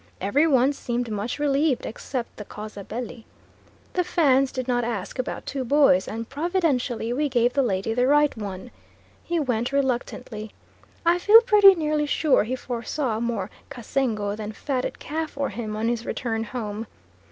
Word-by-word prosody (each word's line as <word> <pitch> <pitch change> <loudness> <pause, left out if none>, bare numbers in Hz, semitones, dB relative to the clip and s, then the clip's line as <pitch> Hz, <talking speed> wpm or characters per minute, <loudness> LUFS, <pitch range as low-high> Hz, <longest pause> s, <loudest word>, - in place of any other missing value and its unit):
Every 275 - +2
one 270 -1 +4
seemed 240 -3 -3
much 210 +3 -3
relieved, 290 -1 +1
except 245 +1 -5
the 210 - -6
causa 210 0 -8
belli. 235 +2 -6 0.7
The 360 - +1
Fans 275 -7 +3
did 255 -1 -4
not 245 -1 +1
ask 230 0 -4
about 255 - -3
two 270 -1 -3
boys 255 -8 +4
and 225 +1 -5
providentially 280 -8 0
we 290 +3 0
gave 245 -1 +2
the 280 - +3
lady 205 -3 0
the 250 +2 +2
right 295 +1 +4
one. 205 +1 -7 0.5
He 340 -1 -1
went 245 -4 -1
reluctantly. 250 -5 -2 0.5
I 345 +1 +4
feel 430 +5 +8
pretty 415 -5 +7
nearly 305 -2 0
sure 290 -6 +3
he 250 +3 -2
foresaw 245 -1 -3
more 225 -4 -2 0.2
kassengo 225 -5 -2
than 215 0 -6
fatted 255 +2 -3
calf 315 +1 -4
for 280 -1 -2
him 215 0 -5
on 220 +1 -1
his 235 -1 -1
return 225 -2 -2
home. 215 -1 -5
250 Hz, 165 wpm, -24 LUFS, 225-290 Hz, 0.7 s, feel